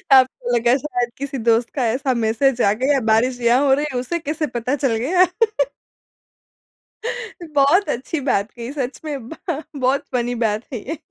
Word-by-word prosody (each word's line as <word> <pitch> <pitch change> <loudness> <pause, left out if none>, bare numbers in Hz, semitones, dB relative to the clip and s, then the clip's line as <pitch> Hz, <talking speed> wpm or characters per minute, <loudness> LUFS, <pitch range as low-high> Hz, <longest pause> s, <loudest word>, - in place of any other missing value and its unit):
आपको 255 -2 +3
लगा 240 +1 +3
शायद 245 -4 -2
किसी 275 0 -4
दोस्त 230 +1 +3
का 260 -4 +1
ऐसा 260 +1 0
मैसेज 245 +3 +2
आ 200 - +4
गया 280 0 +3
बारिश 245 +3 +2
यहाँ 240 +4 +4
हो 265 - +5
रही 290 +2 +1
है 250 - 0
उसे 340 +8 -2
कैसे 310 0 -2
पता 250 +4 0
चल 270 -5 0
गया? 340 +11 +3 2.3
बहुत 290 +7 +4
अच्छी 290 +4 -2
बात 200 -2 +1
कही 235 +1 -7
सच 270 -2 -4
में 280 -6 -5
ब - - -7 0.4
बहुत 270 0 +1
फ़नी 245 0 0
बात 220 -2 0
है 240 - -2
ये। 320 - -3
255 Hz, 175 wpm, -21 LUFS, 235-285 Hz, 2.3 s, हो